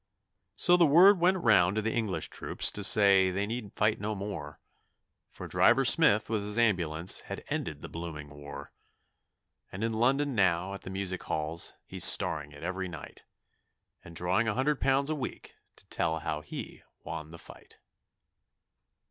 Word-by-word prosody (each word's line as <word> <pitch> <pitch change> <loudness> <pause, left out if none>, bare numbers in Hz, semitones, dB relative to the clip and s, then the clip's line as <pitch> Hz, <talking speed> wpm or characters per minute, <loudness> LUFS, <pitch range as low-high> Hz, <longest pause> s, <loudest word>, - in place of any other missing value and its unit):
So 175 -1 +3
the 175 - +5
word 180 +6 +6
went 180 +2 +3
round 95 -4 +4
to 110 - 0
the 115 - -2
English 110 -5 -2
troops - - +1
to 105 - -5
say 100 -3 +4
they 100 +2 -2
need 110 -1 -6
fight 105 +1 +1
no 105 +1 -3
more, 95 -7 -7 0.7
For - - -10
Driver 135 +3 +3
Smith 120 -9 +5
with 110 -2 -2
his 105 +2 -5
ambulance 90 -7 0
had - - -6
ended - - -4
the - - -8
blooming 80 -3 -8
war: 70 -1 -11 1.0
And 95 +4 -6
in 115 0 -1
London 135 +5 +1
now 95 -2 +1
at 100 - -8
the - - -9
music 95 -1 -4
halls 80 +2 -4
he's - - -3
starring 75 -2 +3
it 70 - -13
every 95 0 -4
night, 80 -4 -11 0.8
And 85 - -13
drawing 90 +7 0
a 105 - -1
hundred 135 +3 -1
pounds 135 +2 +1
a - - -1
week 130 -4 -7 0.2
to - - -19
tell 80 0 -2
how 75 -1 -4
he 75 - -9 0.2
won 80 0 -7
the 85 - -11
fight. - - -15
100 Hz, 170 wpm, -29 LUFS, 85-120 Hz, 1.0 s, word